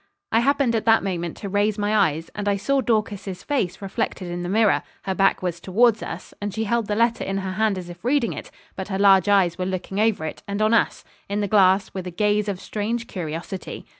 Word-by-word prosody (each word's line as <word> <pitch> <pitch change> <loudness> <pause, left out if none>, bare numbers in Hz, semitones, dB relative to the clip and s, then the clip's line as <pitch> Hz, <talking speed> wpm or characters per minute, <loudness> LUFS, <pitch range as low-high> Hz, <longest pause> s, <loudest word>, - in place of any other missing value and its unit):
I 225 - +4
happened 270 -1 +2
at 225 - -1
that 225 -2 +5
moment 175 -4 -3
to 200 - -6
raise 205 +1 +1
my 210 +1 0
eyes, 165 -6 +1
and 205 -1 -2
I 200 - +1
saw 275 +7 +1
Dorcas's 210 -5 -1
face 200 -10 -2
reflected 185 -2 -3
in 175 0 -4
the 175 - -4
mirror; 215 0 +3 0.2
her 190 - -1
back 195 0 +2
was 175 -2 -2
towards 220 +5 +3
us, 165 - -7
and 205 0 -2
she 220 +3 -2
held 230 0 0
the 210 - -1
letter 230 +1 +2
in 195 0 -2
her 190 -1 -3
hand 215 0 +1
as 180 -1 -6
if 175 0 -11
reading 255 -1 +1
it, - - -8 0.3
but 190 - -5
her 190 -1 -2
large 195 -1 +5
eyes 185 -4 +3
were 180 - -1
looking 190 +1 -3
over 215 -7 +2
it, 155 - -6
and 200 0 -3
on 215 +1 +3
us, 230 - +2 0.3
in 200 +1 -1
the 205 - 0
glass, 195 -1 +4
with 185 -1 -5
a - - -2
gaze 210 +3 +1
of 195 -3 -2
strange 225 +4 -3
curiosity. 175 0 -6
200 Hz, 235 wpm, -23 LUFS, 185-220 Hz, 0.3 s, that